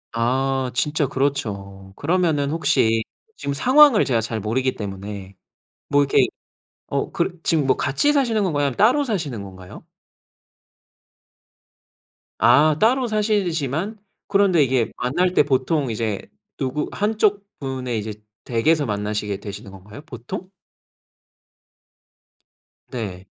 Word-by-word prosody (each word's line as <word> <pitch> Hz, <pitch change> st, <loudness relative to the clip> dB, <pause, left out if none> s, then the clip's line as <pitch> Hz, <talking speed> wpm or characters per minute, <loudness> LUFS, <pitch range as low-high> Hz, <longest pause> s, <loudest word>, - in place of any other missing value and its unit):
아. 130 Hz, +2 st, 0 dB
진짜 145 Hz, +2 st, +1 dB
그렇죠. 100 Hz, -9 st, -3 dB
그러면은 160 Hz, -3 st, +1 dB
혹시 115 Hz, -8 st, +2 dB, 0.3 s
지금 140 Hz, -, -3 dB
상황을 260 Hz, -, +6 dB
제가 120 Hz, -4 st, +1 dB
잘 110 Hz, 0 st, -3 dB
모르기 130 Hz, +5 st, 0 dB
때문에 100 Hz, -1 st, -7 dB, 0.5 s
뭐 145 Hz, 0 st, +4 dB
이렇게 140 Hz, -, +3 dB, 0.6 s
어 -, -, -1 dB
그 175 Hz, 0 st, -2 dB
지금 155 Hz, -4 st, +1 dB
뭐 130 Hz, -, +3 dB
같이 290 Hz, -, +1 dB
사시는 230 Hz, -7 st, +2 dB
건가요? 145 Hz, -6 st, 0 dB
아니면 135 Hz, -, -3 dB
따로 255 Hz, +7 st, +4 dB
사시는 155 Hz, -, -3 dB
건가요? 95 Hz, -2 st, -11 dB, 2.6 s
아 145 Hz, +7 st, +5 dB
따로 250 Hz, +3 st, +3 dB
사시지만 200 Hz, -, -1 dB, 0.3 s
그런데 195 Hz, -6 st, +4 dB
이게 125 Hz, -3 st, +1 dB
만날 175 Hz, +9 st, 0 dB
때 -, -, +5 dB
보통 135 Hz, 0 st, 0 dB
이제 110 Hz, -2 st, -2 dB, 0.4 s
누구 140 Hz, +2 st, -2 dB
한쪽 210 Hz, -1 st, +1 dB
분의 130 Hz, -4 st, -3 dB
이제 105 Hz, 0 st, -5 dB, 0.3 s
댁에서 145 Hz, +6 st, +1 dB
만나시게 105 Hz, -1 st, -2 dB
되시는 100 Hz, -1 st, -8 dB
건가요? 100 Hz, +7 st, -12 dB
보통? 125 Hz, +10 st, -7 dB, 2.4 s
네. 95 Hz, -6 st, -5 dB
135 Hz, 250 characters per minute, -22 LUFS, 110-175 Hz, 2.6 s, 상황을